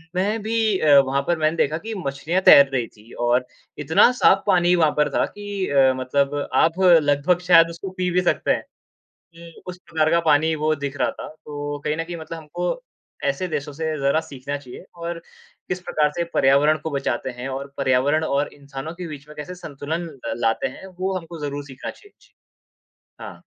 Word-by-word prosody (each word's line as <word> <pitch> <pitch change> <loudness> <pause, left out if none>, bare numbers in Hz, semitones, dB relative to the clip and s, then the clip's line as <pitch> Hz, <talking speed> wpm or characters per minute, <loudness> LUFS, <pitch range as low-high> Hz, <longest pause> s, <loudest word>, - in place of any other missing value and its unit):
मैं 205 +4 0
भी 220 -2 +1
अ, 145 -2 +6
वहाँ 135 0 +1
पर 175 - +1
मैंने 155 +2 +1
देखा 155 +1 +1
कि 220 +6 -6
मछलियाँ 145 +7 -1
तैर 140 -5 +8
रही 120 -3 0
थीं 110 +2 -18
और 125 +1 +2 0.3
इतना 160 - +4
साफ 195 0 +5
पानी 180 -2 +4
वहाँ 160 -3 +3
पर 150 - +3
था - - +3
कि 205 -2 -5
अ, 135 -2 +4
मतलब 140 +2 0 0.2
आप 165 +3 +2
लगभग 165 -1 +4
शायद 165 -2 +7
उसको 170 +3 -7
पी 180 -1 0
भी 180 +1 +2
सकते 180 - +1
हैं। - - 0 0.7
जी, 170 0 -13
उस 180 0 -6
प्रकार 160 -1 +1
का 170 - +4
पानी 155 +1 +3
वो 155 0 +1
दिख 140 -1 -5
रहा - - +1
था, - - -8
तो 145 -1 -7
कहीं 150 - 0
न 165 - -1
कहीं 170 +1 -7
मतलब 165 +1 -7
हमको 175 - -4 0.4
ऐसे 140 +6 -1
देशों 150 -3 -4
से 160 +3 -4
ज़रा 140 +3 +2
सीखना 140 -2 -6
चाहिए 130 0 -11
और 170 0 -5 0.5
किस 180 - -2
प्रकार 150 -4 +1
से 170 - 0
पर्यावरण 140 +3 +4
को 160 - -2
बचाते 140 -1 -2
हैं 125 +2 -5
और 135 +1 -6
पर्यावरण 140 +3 +2
और 145 -2 0
इंसानों 140 +2 -8
के 180 0 -6
बीच 150 -2 -9
में 150 - -13
कैसे 150 +5 -7
संतुलन 160 +1 -5 0.3
लाते 115 -1 +1
हैं, - - -10
वो 190 +1 -3
हमको 165 -1 -9
ज़रूर 145 0 -5
सीखना 135 -2 -8
चाहिए। 410 - -20
जी। - - -25 0.9
हाँ। - - -9
155 Hz, 195 wpm, -22 LUFS, 140-175 Hz, 0.9 s, तैर